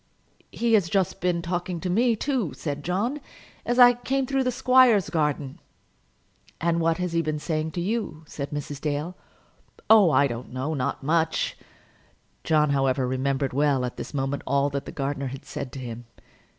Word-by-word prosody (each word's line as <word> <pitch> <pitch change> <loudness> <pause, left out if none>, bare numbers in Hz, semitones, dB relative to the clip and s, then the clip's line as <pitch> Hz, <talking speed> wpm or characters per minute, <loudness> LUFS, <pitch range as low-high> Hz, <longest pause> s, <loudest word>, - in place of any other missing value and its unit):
"He 235 -1 0
has 200 -6 +4
just 190 -2 0
been 175 -1 0
talking 175 0 -3
to 185 - -3
me, 230 +6 +2
too," 250 - -1
said 145 -2 -4
John, 220 - -1 0.5
"as 240 - +1
I 245 -1 +9
came 265 +2 -1
through 270 +1 0
the - - +2
squire's 250 -5 +4
garden." 150 -4 -1 1.0
"And 170 0 +1
what 165 0 +2
has 180 -2 -3
he 165 - +2
been 155 -1 -2
saying 155 0 -2
to 175 - -2
you?" 200 -5 -3
said 140 -1 -6
Mrs. 145 -1 -5
Dale. 150 +4 -2 0.8
"Oh, 210 -5 +8
I 145 -2 +4
don't 120 -2 -5
know; 130 +5 -3
not 140 -1 -2
much." 160 +2 +1 0.9
John, 150 -2 +2
however, 135 -2 +1
remembered 135 +1 -1
well, 140 -2 +2
at 125 - -6
this - - -6
moment, 135 0 -2
all 140 +1 +2
that 140 0 -3
the - - -5
gardener 140 0 -3
had 135 +1 -8
said 130 - -6
to 135 - -6
him. 120 -1 -7
155 Hz, 175 wpm, -25 LUFS, 140-190 Hz, 1.0 s, I